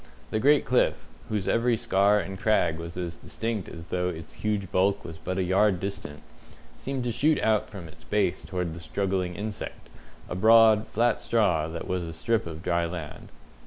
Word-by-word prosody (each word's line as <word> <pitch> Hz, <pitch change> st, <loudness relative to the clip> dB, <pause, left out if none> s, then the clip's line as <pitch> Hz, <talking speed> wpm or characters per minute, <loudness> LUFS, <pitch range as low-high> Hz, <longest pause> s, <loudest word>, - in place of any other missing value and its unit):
The 110 Hz, -, 0 dB
great 145 Hz, +4 st, +4 dB
cliff, 125 Hz, +1 st, +1 dB, 0.2 s
whose 105 Hz, -3 st, -2 dB
every 115 Hz, 0 st, +2 dB
scar 100 Hz, +1 st, +3 dB
and 95 Hz, -1 st, -5 dB
crag 90 Hz, -7 st, +2 dB
was 85 Hz, +1 st, -7 dB
as 85 Hz, -2 st, -4 dB
distinct 110 Hz, -4 st, -4 dB
as 85 Hz, 0 st, -10 dB
though 90 Hz, 0 st, 0 dB
its 80 Hz, -2 st, -8 dB
huge 105 Hz, -3 st, -1 dB
bulk 100 Hz, +2 st, +1 dB
was 80 Hz, -1 st, -8 dB
but 95 Hz, -, -4 dB
a 95 Hz, -, +1 dB
yard 95 Hz, +1 st, +3 dB
distant, 85 Hz, -6 st, -6 dB, 0.5 s
seemed 135 Hz, -2 st, -4 dB
to 120 Hz, -, -1 dB
shoot 150 Hz, +6 st, +2 dB
out 110 Hz, -1 st, +2 dB
from 95 Hz, -5 st, -9 dB
its 80 Hz, 0 st, -16 dB
base 100 Hz, +2 st, 0 dB
towards 90 Hz, -3 st, -3 dB
the 85 Hz, -, -8 dB
struggling 90 Hz, +2 st, -2 dB
insect, 105 Hz, +2 st, -6 dB, 0.4 s
a -, -, -5 dB
broad, 110 Hz, +2 st, +6 dB
flat 115 Hz, +1 st, +1 dB
straw, 100 Hz, -9 st, +1 dB
that 80 Hz, +1 st, -6 dB
was 90 Hz, -1 st, -1 dB
a 80 Hz, -1 st, -6 dB
strip 110 Hz, +6 st, 0 dB
of 80 Hz, 0 st, -8 dB
dry 85 Hz, -1 st, +1 dB
land. 80 Hz, -3 st, -7 dB
95 Hz, 190 wpm, -27 LUFS, 85-110 Hz, 0.5 s, broad